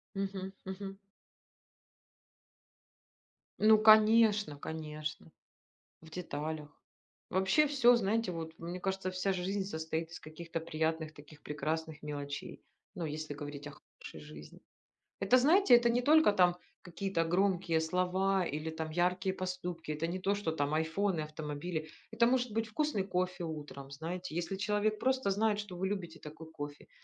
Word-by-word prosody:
Мгм 195 Hz, -1 st, -3 dB
мгм. 195 Hz, +1 st, -6 dB, 2.6 s
Ну 215 Hz, +1 st, +7 dB
конечно, 215 Hz, -5 st, +6 dB
конечно. 155 Hz, +1 st, -6 dB, 0.7 s
В 160 Hz, -, -14 dB
деталях. 155 Hz, -3 st, -4 dB, 0.6 s
Вообще 195 Hz, +12 st, +3 dB
всё, 245 Hz, -4 st, +5 dB
знаете, 225 Hz, -2 st, +1 dB
вот 165 Hz, -1 st, -5 dB
мне 175 Hz, +2 st, -5 dB
кажется, 190 Hz, 0 st, -2 dB
вся 185 Hz, +1 st, 0 dB
жизнь 190 Hz, +2 st, -1 dB
состоит 160 Hz, -2 st, -3 dB
из -, -, -8 dB
каких-то 165 Hz, +2 st, -6 dB
приятных 160 Hz, -1 st, -2 dB
таких 145 Hz, 0 st, -15 dB
прекрасных 155 Hz, +1 st, -3 dB
мелочей, 145 Hz, -1 st, -5 dB, 0.3 s
ну, 175 Hz, -4 st, -3 dB
если 155 Hz, 0 st, -4 dB
говорить 145 Hz, 0 st, -7 dB
о -, -, -7 dB, 0.3 s
хорошей 80 Hz, -, -9 dB
жизни. 75 Hz, 0 st, -12 dB, 0.6 s
Это, 200 Hz, +6 st, +5 dB
знаете, 315 Hz, +3 st, +6 dB
это 240 Hz, 0 st, +3 dB
не 240 Hz, +1 st, +2 dB
только 310 Hz, -3 st, +6 dB
там 180 Hz, -3 st, +4 dB, 0.3 s
какие-то 180 Hz, -1 st, -1 dB
громкие 175 Hz, -1 st, +2 dB
слова 185 Hz, +3 st, +1 dB
или 155 Hz, +2 st, -3 dB
там 160 Hz, 0 st, -4 dB
яркие 180 Hz, +3 st, +1 dB
поступки, 180 Hz, -4 st, -4 dB
это 150 Hz, +2 st, -2 dB
не 175 Hz, +2 st, -3 dB
то, 195 Hz, +2 st, +1 dB
что 200 Hz, -5 st, -2 dB
там 145 Hz, -1 st, 0 dB
"Айфоны", 160 Hz, +3 st, 0 dB
автомобили. 155 Hz, +1 st, -4 dB, 0.2 s
Это 230 Hz, +1 st, +4 dB
может 250 Hz, 0 st, +2 dB
быть 225 Hz, +1 st, 0 dB
вкусный 230 Hz, -3 st, 0 dB
кофе 180 Hz, -2 st, -1 dB
утром, 145 Hz, -4 st, -7 dB
знаете, 165 Hz, +4 st, -5 dB
если 175 Hz, +3 st, -2 dB
человек 210 Hz, +1 st, 0 dB
просто 260 Hz, -5 st, +1 dB
знает, 210 Hz, +1 st, +2 dB
что 205 Hz, -4 st, -8 dB
вы 190 Hz, +2 st, -1 dB
любите 175 Hz, -5 st, -4 dB
такой 160 Hz, +1 st, -10 dB
кофе, 145 Hz, -2 st, -8 dB
180 Hz, 140 wpm, -33 LUFS, 155-200 Hz, 2.6 s, Ну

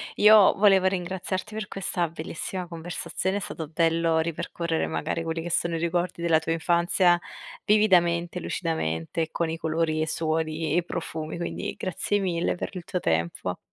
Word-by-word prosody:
io 210 Hz, -1 st, +7 dB
volevo 195 Hz, -2 st, +5 dB
ringraziarti 185 Hz, +2 st, -3 dB
per 215 Hz, -1 st, -5 dB
questa 180 Hz, -3 st, -2 dB
bellissima 170 Hz, +3 st, -5 dB
conversazione, 175 Hz, +3 st, -3 dB
è -, -, -1 dB
stato 160 Hz, -5 st, -5 dB
bello 165 Hz, 0 st, +2 dB
ripercorrere 165 Hz, 0 st, -2 dB
magari 165 Hz, -, -2 dB
quelli 165 Hz, 0 st, -3 dB
che 175 Hz, -, -4 dB
sono 170 Hz, 0 st, +1 dB
i -, -, -2 dB
ricordi 170 Hz, +1 st, -1 dB
della 165 Hz, -2 st, +4 dB
tua 160 Hz, +1 st, -3 dB
infanzia 175 Hz, +2 st, +3 dB, 0.5 s
vividamente, 175 Hz, -4 st, +3 dB
lucidamente 160 Hz, -, -2 dB
con 170 Hz, -1 st, -1 dB
i 160 Hz, -, -2 dB
colori 160 Hz, -1 st, 0 dB
e 155 Hz, -, 0 dB
suoni 160 Hz, 0 st, -1 dB
e 175 Hz, -, +3 dB
profumi, 165 Hz, -2 st, -5 dB
quindi 170 Hz, -, -4 dB
grazie 195 Hz, +2 st, -1 dB
mille 175 Hz, -3 st, 0 dB
per -, -, -4 dB
il 180 Hz, -, -6 dB
tuo 180 Hz, -, -3 dB
tempo. 85 Hz, -, -1 dB
170 Hz, 155 wpm, -26 LUFS, 160-185 Hz, 0.5 s, io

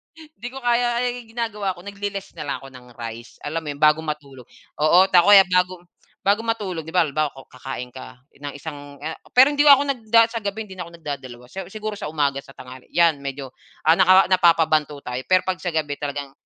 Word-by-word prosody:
Hindi 310 Hz, -6 st, -11 dB
ko 265 Hz, +2 st, -9 dB
kaya 240 Hz, 0 st, +1 dB
ay, 245 Hz, -1 st, -4 dB
gina-gawa 215 Hz, -4 st, -3 dB
ko 175 Hz, -, -13 dB
nagle-less 200 Hz, 0 st, -6 dB
nalang 145 Hz, -3 st, -4 dB
ako -, -, -9 dB
ng 125 Hz, -1 st, -14 dB
rice, 115 Hz, 0 st, -8 dB
alam 155 Hz, +3 st, -2 dB
mo -, -, -10 dB
'yon, 145 Hz, -, -10 dB
bago 150 Hz, +1 st, +5 dB
matulog 145 Hz, -5 st, -7 dB, 0.3 s
oo 155 Hz, +4 st, +5 dB
ta 175 Hz, -2 st, +6 dB
o 205 Hz, -, +7 dB
kaya 195 Hz, -1 st, +10 dB
bago 180 Hz, -1 st, 0 dB
m -, -, -28 dB, 0.4 s
bago 200 Hz, +2 st, +3 dB
matulog 205 Hz, -8 st, -3 dB
,'di 160 Hz, -, -8 dB
ba 180 Hz, -, +5 dB
halimbawa, 150 Hz, 0 st, -1 dB
ko 135 Hz, -, -12 dB
kakain 125 Hz, -1 st, -7 dB
ka 130 Hz, 0 st, -11 dB, 0.2 s
ng 145 Hz, 0 st, -6 dB
isang 145 Hz, -1 st, -9 dB
a 160 Hz, +1 st, -4 dB, 0.2 s
pero 260 Hz, +3 st, +7 dB
hindi 290 Hz, 0 st, +2 dB
ako 280 Hz, -1 st, +8 dB
nagda 230 Hz, -4 st, +3 dB
sa 230 Hz, -, -3 dB
gabi 205 Hz, +2 st, -3 dB
hindi 190 Hz, -, -11 dB
na 175 Hz, -, -5 dB
ako -, -, -14 dB
nag-dadalawa, 130 Hz, -6 st, -7 dB
sa 190 Hz, -2 st, -7 dB
siguro 215 Hz, 0 st, -5 dB
sa -, -, -4 dB
umaga, 140 Hz, -3 st, 0 dB
sa 135 Hz, -, -16 dB
tangali 130 Hz, 0 st, -12 dB
'yan 165 Hz, -4 st, +4 dB
medyo, 135 Hz, -1 st, -6 dB, 0.3 s
ah, 160 Hz, +1 st, +6 dB
naka 185 Hz, +1 st, +6 dB
napapa-banto 160 Hz, -5 st, +3 dB
tayo, 125 Hz, 0 st, -4 dB
pero 185 Hz, 0 st, +4 dB
'pag 185 Hz, -1 st, -1 dB
sa -, -, -5 dB
gabi 150 Hz, -2 st, -1 dB
talagang, 145 Hz, -1 st, -5 dB
170 Hz, 220 wpm, -22 LUFS, 145-205 Hz, 0.4 s, kaya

